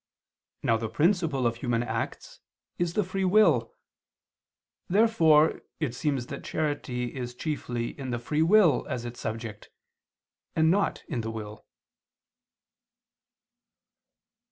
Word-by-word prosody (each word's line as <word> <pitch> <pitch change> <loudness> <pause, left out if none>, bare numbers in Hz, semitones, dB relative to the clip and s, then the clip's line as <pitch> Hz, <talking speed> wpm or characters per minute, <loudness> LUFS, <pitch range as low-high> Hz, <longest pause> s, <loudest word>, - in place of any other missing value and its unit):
Now 115 - +3
the 110 0 -4
principle 160 - +1
of 115 0 +1
human 120 -1 0
acts - - -4 0.4
is 175 -1 -1
the 210 - +3
free 190 +1 -3
will. 210 +4 +4 1.1
Therefore 175 -7 +4 0.2
it 150 -7 -1
seems 135 -1 -1
that 140 +2 -7
charity 130 -6 -2
is 125 -2 -5
chiefly 125 -4 -3
in 130 -2 -5
the 120 - -1
free 150 +6 -1
will 180 0 +5
as 120 -1 -3
its 120 0 -7
subject 110 -1 -6 0.9
and 160 0 +4
not 200 +2 0
in 120 - -2
the 110 - -4
will. 110 -1 -8
140 Hz, 120 wpm, -27 LUFS, 120-165 Hz, 1.1 s, will